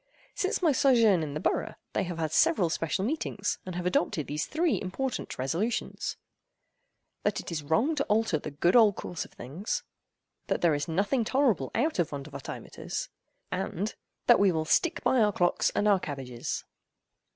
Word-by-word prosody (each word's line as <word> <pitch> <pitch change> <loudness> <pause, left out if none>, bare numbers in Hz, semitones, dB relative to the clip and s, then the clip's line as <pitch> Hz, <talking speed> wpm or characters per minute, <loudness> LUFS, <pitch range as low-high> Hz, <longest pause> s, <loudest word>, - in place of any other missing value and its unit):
Since 380 0 -1
my 325 - +5
sojourn 230 - +4
in 150 -2 -4
the - - -1
borough, - - -1 0.2
they - - 0
have 175 -1 -5
had 160 -2 -1
several 185 - +3
special 165 +3 -1
meetings, 225 -7 -2
and 185 - -5
have 180 0 -3
adopted 175 -4 +1
these 150 +2 -3
three 330 +1 +1
important 245 +8 -3
resolutions: 170 - -2 1.0
"That - - 0
it - - -7
is 160 -2 -2
wrong 160 - +2
to 290 -2 0
alter 210 -7 +2
the - - -6
good 160 - +1
old 215 -5 +7
course 175 - -5
of - - -16
things:" 155 - -4 0.6
"That - - 0
there 170 -3 +4
is 145 0 -1
nothing 200 +9 +1
tolerable 225 - +2
out 310 - +1
of 170 -2 +2
Vondervotteimittiss:" 140 -1 -6 0.4
and— 205 +5 -2 0.3
"That 240 - +6
we 200 -1 +5
will 160 -2 -1
stick 340 - +2
by 260 - +3
our 210 -1 +4
clocks 175 -2 +2
and 210 - +2
our 200 -2 +5
cabbages." 135 -7 -4
185 Hz, 175 wpm, -29 LUFS, 155-235 Hz, 1.0 s, old